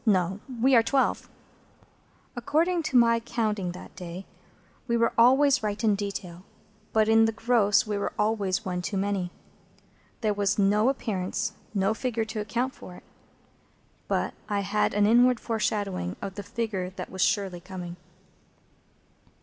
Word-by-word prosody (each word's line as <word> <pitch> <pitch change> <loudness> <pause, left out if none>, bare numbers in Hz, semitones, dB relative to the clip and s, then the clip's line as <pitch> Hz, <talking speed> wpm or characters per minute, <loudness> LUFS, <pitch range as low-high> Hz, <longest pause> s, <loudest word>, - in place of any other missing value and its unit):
No. 190 -3 +1 0.2
We 265 +3 +4
are 235 - +7
twelve." 265 +4 0 1.1
According 325 +8 +1
to 260 - +3
my 230 -1 +5
counting 215 -5 -2
that 180 - -11
day, 180 0 -8 0.6
we 235 -1 +1
were 230 0 +2
always 265 +3 +5
right 210 +1 -3
in 215 -2 +4
detail, 195 -3 -5 0.5
but 220 -1 +3
in 225 0 +5
the 225 - +1
gross 220 -2 +2
we 210 -1 -2
were - - -2
always 205 -4 0
one 180 -1 -2
too 195 +2 -3
many. 195 -2 -1 0.9
There 215 -2 +1
was 205 0 0
no 210 +4 +3
appearance—no 195 -3 -2
figure—to 225 -2 -3
account 240 +5 -2
for 180 - -11
it; - - -14 1.0
but - - -1 0.2
I 205 -1 0
had 200 +2 0
now - - -2
an 205 - +4
inward 245 +2 +5
foreshadowing 205 - -2
of 195 - -5
the 205 - -6
figure 205 -3 -3
that 185 -1 -8
was 190 - -4
surely 195 -4 +1
coming. 180 -1 -8
210 Hz, 150 wpm, -27 LUFS, 190-230 Hz, 1.1 s, are